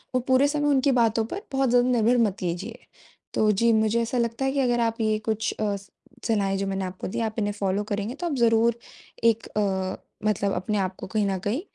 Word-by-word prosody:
वो -, -, +4 dB
पूरे 260 Hz, +2 st, +4 dB
समय 290 Hz, 0 st, 0 dB
उनकी 275 Hz, 0 st, +3 dB
बातों 225 Hz, 0 st, +1 dB
पर 360 Hz, -, -5 dB
बहुत 270 Hz, -1 st, +1 dB
ज़्यादा 245 Hz, +1 st, +4 dB
निर्भर 240 Hz, 0 st, +3 dB
मत 205 Hz, -4 st, 0 dB
कीजिए। 185 Hz, +6 st, -4 dB, 0.6 s
तो 215 Hz, -1 st, +3 dB
जी, 230 Hz, +3 st, +3 dB
मुझे 220 Hz, +1 st, +2 dB
ऐसा 230 Hz, +2 st, -2 dB
लगता 235 Hz, +2 st, -1 dB
है 270 Hz, -, +1 dB
कि 280 Hz, -, -1 dB
अगर 245 Hz, -2 st, +2 dB
आप 230 Hz, 0 st, 0 dB
ये 215 Hz, -1 st, +2 dB
कुछ 220 Hz, 0 st, 0 dB
अ, 210 Hz, -2 st, 0 dB, 0.5 s
सलाहें 200 Hz, -4 st, +1 dB
जो 195 Hz, 0 st, -2 dB
मैंने 195 Hz, 0 st, -2 dB
आपको 185 Hz, 0 st, -6 dB
दीं 195 Hz, -, -3 dB
आप 220 Hz, -1 st, -3 dB
इन्हें 205 Hz, -1 st, 0 dB
फॉलो 200 Hz, 0 st, -1 dB
करेंगे 205 Hz, +4 st, -2 dB
तो 350 Hz, +4 st, -3 dB
आप 325 Hz, -, -2 dB
ज़रूर 230 Hz, 0 st, +3 dB, 0.4 s
एक 230 Hz, -1 st, +2 dB
अ, 190 Hz, -3 st, -1 dB, 0.3 s
मतलब 200 Hz, -1 st, +1 dB
अपने 195 Hz, +4 st, -1 dB
आपको 185 Hz, -1 st, -3 dB
कहीं 210 Hz, +1 st, 0 dB
न 195 Hz, -1 st, 0 dB
कहीं 240 Hz, +9 st, 0 dB
220 Hz, 220 wpm, -25 LUFS, 200-240 Hz, 0.6 s, वो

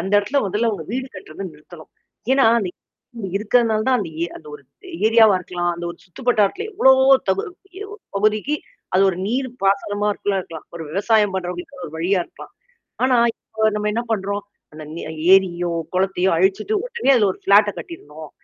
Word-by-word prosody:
அந்த 195 Hz, -, -4 dB
இடத்துல 205 Hz, +8 st, 0 dB
முதல்ல 210 Hz, +5 st, 0 dB
அவங்க 195 Hz, -7 st, -5 dB
வீடு 260 Hz, +1 st, -2 dB
கட்டுறந்து 185 Hz, 0 st, -8 dB
நிறுத்தணும். 155 Hz, +2 st, -15 dB, 0.4 s
ஏனா, 270 Hz, -3 st, +4 dB, 0.2 s
இடம் 195 Hz, +1 st, -11 dB
இருக்கிறதுனால 215 Hz, +1 st, +2 dB
தான் 255 Hz, -1 st, +3 dB
அந்த 180 Hz, -6 st, -4 dB
ஏ -, -, +2 dB
அந்த 155 Hz, -, -14 dB
ஒரு 145 Hz, -, -12 dB, 0.4 s
ஏரியாவா 220 Hz, -2 st, +6 dB
இருக்கலாம். 175 Hz, -1 st, -2 dB
அந்த 170 Hz, 0 st, -7 dB
ஒரு 170 Hz, -, -11 dB
சுத்துப்பட்டார்த்துல 245 Hz, -, 0 dB
எவ்வளவோ 265 Hz, -8 st, +5 dB, 0.2 s
தகு 190 Hz, +1 st, +1 dB, 0.4 s
எ -, -, -5 dB, 0.3 s
பகுதிக்கு 215 Hz, +7 st, +1 dB, 0.4 s
அது 190 Hz, -, +5 dB
ஒரு 175 Hz, -, -6 dB
நீர் 255 Hz, +5 st, -1 dB
பாசனமா 205 Hz, +1 st, +1 dB
இருக்குள்ளா 200 Hz, -1 st, -2 dB
இருக்கலாம். 165 Hz, -3 st, -10 dB
ஒரு 170 Hz, -, -6 dB
விவசாயம் 205 Hz, +3 st, +2 dB
பண்றவங்களுக்குான 180 Hz, -1 st, -5 dB
ஒரு 150 Hz, -, -12 dB
வழியா 185 Hz, +4 st, +1 dB
இருக்கலாம். -, -, -14 dB, 0.5 s
ஆனா, 255 Hz, -1 st, +3 dB, 0.2 s
இப்போ 220 Hz, -, -9 dB
நம்ம 210 Hz, 0 st, -1 dB
என்ன 230 Hz, +2 st, -1 dB
பண்ணறோம், 200 Hz, -1 st, -2 dB, 0.3 s
அந்த 155 Hz, +1 st, -10 dB
நெ 170 Hz, -, -6 dB, 0.3 s
ஏரியோ, 175 Hz, -2 st, +1 dB, 0.2 s
குளத்தையோ 190 Hz, 0 st, +1 dB
அழிச்சுட்டு 195 Hz, -, +1 dB
உடனே 475 Hz, -, 0 dB
அது 225 Hz, -, +3 dB
ஒரு -, -, -15 dB
ஃப்ளாட்ட 205 Hz, +1 st, +5 dB
கட்டிருணும். 155 Hz, -, -10 dB
200 Hz, 165 wpm, -21 LUFS, 180-225 Hz, 0.5 s, ஏரியாவா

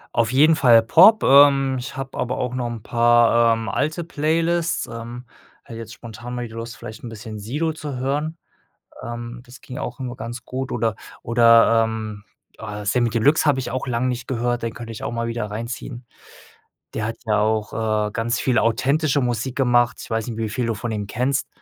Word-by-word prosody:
Auf 115 Hz, -1 st, +2 dB
jeden 155 Hz, +4 st, +5 dB
Fall 120 Hz, -7 st, +6 dB
Pop. 185 Hz, -, +6 dB
Ähm. 135 Hz, -1 st, +5 dB
Ich 125 Hz, -, -7 dB
habe 135 Hz, 0 st, -6 dB
aber 125 Hz, +1 st, -2 dB
auch 125 Hz, -1 st, -2 dB
noch 125 Hz, -1 st, -2 dB
'n 115 Hz, -2 st, -7 dB
paar, 120 Hz, 0 st, +4 dB
ähm, 115 Hz, -1 st, -4 dB
alte 155 Hz, -, -1 dB
Playlists. 165 Hz, +1 st, 0 dB
Ähm. 120 Hz, +2 st, -8 dB, 0.4 s
Hätte 115 Hz, -1 st, -9 dB
jetzt 110 Hz, -1 st, -8 dB
spontan 120 Hz, +2 st, -9 dB
mal 120 Hz, 0 st, -3 dB
die 110 Hz, -, -13 dB
Lust, 115 Hz, +1 st, -7 dB
vielleicht 110 Hz, -1 st, -10 dB
'n 120 Hz, -, -6 dB
bisschen 110 Hz, -1 st, -8 dB
Sido 145 Hz, +10 st, -2 dB
zu 150 Hz, -3 st, -6 dB
hören. 145 Hz, +5 st, -2 dB, 0.7 s
Ähm, 120 Hz, +1 st, -7 dB
das 125 Hz, 0 st, -14 dB
ging 125 Hz, -, -9 dB
auch 125 Hz, +2 st, -6 dB
immer 125 Hz, -1 st, -5 dB
ganz 115 Hz, +2 st, -7 dB
gut 130 Hz, 0 st, -4 dB
oder 115 Hz, -2 st, 0 dB, 0.3 s
oder, 115 Hz, -1 st, +5 dB
ähm, 110 Hz, -2 st, -5 dB, 0.3 s
ah, 105 Hz, 0 st, -7 dB
Samy 120 Hz, +2 st, +2 dB
Deluxe 120 Hz, +8 st, +3 dB
habe 145 Hz, -3 st, +3 dB
ich 130 Hz, -, -3 dB
auch 130 Hz, -, -3 dB
lang 125 Hz, 0 st, 0 dB
nicht 125 Hz, -1 st, -3 dB
gehört, 120 Hz, -1 st, -1 dB
den 115 Hz, -1 st, -2 dB
könnte 115 Hz, -1 st, -8 dB
ich 110 Hz, -, -9 dB
auch -, -, -3 dB
mal 115 Hz, 0 st, -2 dB
wieder 115 Hz, -2 st, -3 dB
reinziehen. 120 Hz, +3 st, -6 dB, 0.9 s
Der 110 Hz, -, -2 dB
hat 115 Hz, +1 st, -4 dB
ja 105 Hz, -1 st, +2 dB
auch, 110 Hz, 0 st, 0 dB
äh, 110 Hz, -1 st, -1 dB
ganz 115 Hz, +2 st, -1 dB
viel 125 Hz, -3 st, +1 dB
authentische 135 Hz, +6 st, +1 dB
Musik 125 Hz, 0 st, -2 dB
gemacht. 120 Hz, -2 st, +3 dB
Ich -, -, -10 dB
weiß 110 Hz, -1 st, -1 dB
nicht, 115 Hz, -, -5 dB
wie 110 Hz, -1 st, -1 dB
viel 120 Hz, +2 st, -2 dB
du 115 Hz, -, -1 dB
von 115 Hz, +2 st, -4 dB
ihm 105 Hz, -2 st, -3 dB
kennst. 130 Hz, +5 st, -1 dB
120 Hz, 205 wpm, -22 LUFS, 115-130 Hz, 0.9 s, Fall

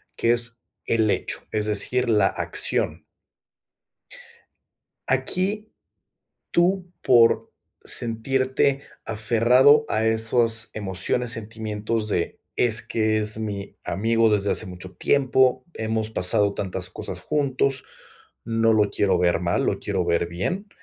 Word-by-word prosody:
que 115 Hz, -, +2 dB
es 115 Hz, -1 st, +1 dB, 0.3 s
el 110 Hz, -2 st, +2 dB
hecho, -, -, -2 dB
es 105 Hz, -1 st, -1 dB
decir, 120 Hz, +4 st, 0 dB
la 105 Hz, -3 st, +4 dB
acción. -, -, -1 dB, 2.0 s
Aquí, 205 Hz, +4 st, 0 dB, 0.8 s
tú 180 Hz, +1 st, +1 dB
por 120 Hz, -2 st, +4 dB, 0.3 s
sentirte 130 Hz, +4 st, +1 dB, 0.2 s
aferrado 120 Hz, +7 st, +4 dB
a 110 Hz, -, 0 dB
esos 115 Hz, 0 st, +1 dB
emociones, 105 Hz, +4 st, -1 dB
sentimientos 110 Hz, -1 st, -3 dB
de: 90 Hz, -5 st, -2 dB, 0.2 s
"Es 115 Hz, -2 st, +2 dB
que 110 Hz, -1 st, 0 dB
es 105 Hz, 0 st, -1 dB
mi 100 Hz, -2 st, -5 dB
amigo 115 Hz, +5 st, +1 dB
desde 105 Hz, -1 st, +1 dB
hace -, -, -2 dB
mucho 90 Hz, 0 st, -9 dB
tiempo. 130 Hz, -2 st, +2 dB
Hemos 110 Hz, 0 st, -2 dB
pasado 100 Hz, 0 st, 0 dB
tantas 90 Hz, -2 st, -4 dB
cosas -, -, -7 dB
juntos, 135 Hz, -2 st, -1 dB, 0.6 s
no 115 Hz, 0 st, +2 dB
lo 105 Hz, -2 st, +3 dB
quiero 95 Hz, -3 st, +1 dB
ver 85 Hz, -1 st, +2 dB
mal, 85 Hz, 0 st, 0 dB
lo -, -, 0 dB
quiero -, -, -1 dB
ver 85 Hz, 0 st, +1 dB
bien". 180 Hz, -, -3 dB
110 Hz, 120 wpm, -23 LUFS, 105-125 Hz, 2.0 s, la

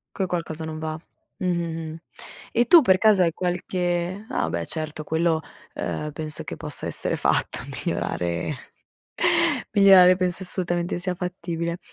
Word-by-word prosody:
Che 190 Hz, -, 0 dB
qualcosa 165 Hz, -3 st, -3 dB
non 160 Hz, 0 st, -5 dB
va. 155 Hz, 0 st, -4 dB, 0.4 s
Mh, 200 Hz, -, -4 dB
mh, 165 Hz, -2 st, -2 dB
mh. -, -, -8 dB, 0.5 s
E 240 Hz, -, +3 dB
tu 330 Hz, +7 st, +8 dB
per 190 Hz, -9 st, +4 dB
caso 210 Hz, -1 st, +5 dB
hai 170 Hz, -, +2 dB
qualche 180 Hz, +2 st, -2 dB
ah 80 Hz, -, -1 dB
beh 85 Hz, 0 st, -2 dB
certo, 155 Hz, -, -4 dB
quello, 160 Hz, +1 st, +1 dB, 0.3 s
ehm, 150 Hz, 0 st, -3 dB
penso 155 Hz, +1 st, -5 dB
che -, -, -7 dB
possa -, -, -5 dB
essere -, -, -2 dB
fatto -, -, +1 dB, 0.3 s
migliorare 85 Hz, -, -2 dB, 1.2 s
migliorare 190 Hz, -2 st, +7 dB
penso 180 Hz, 0 st, -1 dB
assolutamente 175 Hz, -1 st, -2 dB
sia 180 Hz, 0 st, -2 dB
fattibile. 170 Hz, -1 st, -4 dB
175 Hz, 145 wpm, -24 LUFS, 160-185 Hz, 1.2 s, tu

